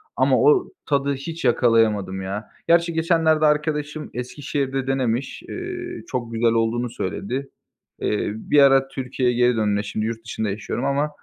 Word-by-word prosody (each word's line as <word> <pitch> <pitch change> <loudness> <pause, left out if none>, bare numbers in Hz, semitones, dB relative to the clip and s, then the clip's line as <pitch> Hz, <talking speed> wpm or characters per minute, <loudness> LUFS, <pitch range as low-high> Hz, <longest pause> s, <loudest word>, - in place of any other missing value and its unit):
ama - - +3
o 430 -4 +4 0.2
tadı 140 -1 +1
hiç 160 +3 -6
yakalayamadım, 110 -6 +2
ya. 100 +3 -5 0.2
Gerçi 170 0 +3
geçenlerde 160 -1 +3
arkadaşım 150 0 0
Eskişehir'de 135 +1 -3
denemiş, 130 -1 -1
ııı, 355 -1 -6
çok 120 -3 -4
güzel 115 0 +2
olduğunu 115 +2 0
söyledi. 120 +5 -4 0.5
Eee, 105 0 -1
bir 130 +6 +2
ara 135 -1 +5
Türkiye'ye 130 -2 -1
geri 125 0 +3
dönme 105 -2 +1
şimdi 105 +1 -3
yurt 115 0 -4
dışında 110 -1 -3
yaşıyorum 100 +3 -3
ama 140 +2 +1
130 Hz, 145 wpm, -22 LUFS, 115-150 Hz, 0.5 s, ara